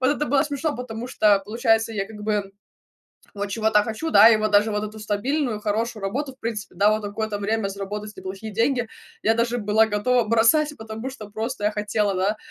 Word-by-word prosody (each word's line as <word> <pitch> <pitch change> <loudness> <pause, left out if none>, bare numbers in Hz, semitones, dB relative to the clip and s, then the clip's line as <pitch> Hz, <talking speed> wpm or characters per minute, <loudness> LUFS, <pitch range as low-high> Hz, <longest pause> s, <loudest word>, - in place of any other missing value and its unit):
вот 260 +2 +3
это 300 - -1
было 275 +1 +3
смешно, 295 +1 -2
потому 240 -1 -6
что 210 -5 +3
получается 225 0 +1
я 195 -2 -2
как 220 - -11
бы 210 -2 -1 0.8
вот 205 -1 -3
чего-то 215 0 +2
хочу, 225 +9 -4
да, 210 +3 +9
и 225 - +5
вот 215 0 -1
даже 205 +1 +4
вот 210 0 -1
эту 215 0 -7
стабильную 230 +3 -1
хорошую 215 0 -2
работу, 270 +7 -3
в - - -49
принципе, 225 -3 -5
да, 205 +1 +4
вот 215 0 0
на - - -3
какое-то 215 0 -3
время 205 0 -1
заработать 205 +2 -6
не - - -8
плохие 195 +3 -6
деньги 240 +2 +1 0.4
я 220 - +4
даже 235 +1 0
была 215 +1 +3
готова 225 +3 +1
бросать, 295 +7 +3
потому 220 +3 -6
что 220 -6 -10
просто 225 +1 -4
я 210 - +2
хотела, 210 -1 0
да, 195 +4 0
220 Hz, 210 wpm, -23 LUFS, 210-235 Hz, 0.8 s, да